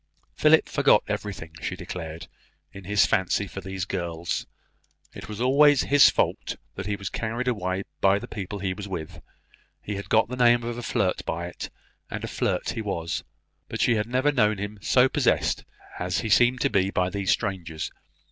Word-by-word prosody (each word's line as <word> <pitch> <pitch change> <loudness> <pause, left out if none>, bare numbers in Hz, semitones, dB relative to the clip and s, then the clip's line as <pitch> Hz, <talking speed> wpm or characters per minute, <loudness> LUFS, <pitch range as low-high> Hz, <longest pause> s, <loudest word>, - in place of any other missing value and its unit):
Philip - - +4
forgot - - +4
everything, 95 -6 -4
she - - -3
declared, 80 -2 -7 0.5
in 95 -1 -10
his 105 +1 +4
fancy 100 -1 +1
for 95 0 -7
these 95 -1 -4
girls; 85 -2 -3 0.7
it - - -9
was 105 0 -6
always 140 +3 +5
his 145 0 +7
fault - - -1 0.2
that 95 +1 -6
he 105 - 0
was 100 -1 -6
carried 115 +3 -3
away 95 -5 -1 0.2
by 95 +1 +4
the - - -7
people 105 -1 -5
he 95 -1 -2
was 100 +1 -7
with: 80 -5 -6 0.6
he 105 -1 -5
had 100 - -7
got 110 0 +4
the 125 - -5
name 120 -1 +4
of 120 0 -3
a 120 - -5
flirt 95 -5 0
by 85 +1 -3
it, 85 - -7 0.4
and - - -5
a - - -3
flirt - - -1
he 115 - -4
was; 85 -7 -3 0.5
but - - -5
she 120 - +4
had 105 -1 0
never 130 +4 +2
known 110 -6 +2
him 100 +1 -5
so 125 +5 +4
possessed - - +1 0.3
as 90 +1 -1
he 110 - -3
seemed 120 +3 +4
to - - +2
be 95 0 +2
by 90 -1 0
these 100 -2 -2
strangers. 90 -7 -1
100 Hz, 190 wpm, -26 LUFS, 90-115 Hz, 0.7 s, his